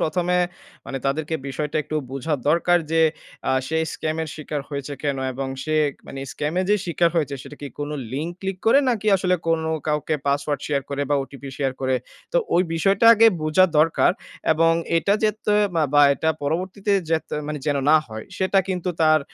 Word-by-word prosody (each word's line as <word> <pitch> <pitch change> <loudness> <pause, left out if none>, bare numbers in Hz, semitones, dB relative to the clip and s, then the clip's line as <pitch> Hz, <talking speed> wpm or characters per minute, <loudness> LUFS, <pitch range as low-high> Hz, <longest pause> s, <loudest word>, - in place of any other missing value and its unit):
১ম 175 +3 0
এ - - +4 0.5
মানে 135 - -4
তাদেরকে 150 +3 -1
বিষয়টা 150 +2 -3
একটু 155 +2 -4
বুঝা 135 +3 -2
দরকার 175 +2 +4
যে 165 0 +4 0.5
আ - - +3 0.2
সে 160 - 0
scam 155 0 -3
এর 160 - -5
শিকার 150 -1 -4
হয়েছে 140 -1 -5
কেন? 140 -2 0 0.2
এবং 135 +1 -4 0.2
সে 155 -1 +2 0.2
মানে 135 - -8
scam 150 +2 -3
এ - - +1
যে 210 - +5
শিকার 170 0 +2
হয়েছে, 145 -4 0
সেটা 145 +1 -11
কি 145 - -4
কোন 145 0 -3 0.2
লিঙ্ক 155 +5 -2
ক্লিক 195 -1 -3
করে 230 +5 +6
নাকি 215 -3 -2
আসলে 185 -1 +1
কোনো 160 -1 +1 0.2
কাউকে 150 0 0
password 140 0 0
share 140 -3 -1
করে 140 0 -1
বা - - +4
OTP 140 +1 -11
শেয়ার 135 -1 0
করে? 130 -1 +1 0.4
তো - - +2 0.2
ওই 175 - +5
বিষয়টা 195 +6 +2
আগে 225 +1 +6 0.2
বুঝা 155 +4 +4
দরকার। 160 +2 +4 0.4
এবং 165 +1 +3 0.2
এটা 200 +4 +2
যেত্তয়ে 210 0 +2
মা 160 - +3
বা 145 - +7
এটা 160 +3 0
পরবর্তীতে 185 +7 -1 0.2
যেত 160 -1 0 0.2
মানে 150 - -3
যেন 145 -1 +2
না 155 - +8
হয়, 110 -1 -8
সেটা 190 +1 +2
কিন্তু 185 -1 -2
তার 155 0 +5
155 Hz, 190 wpm, -23 LUFS, 145-175 Hz, 0.5 s, না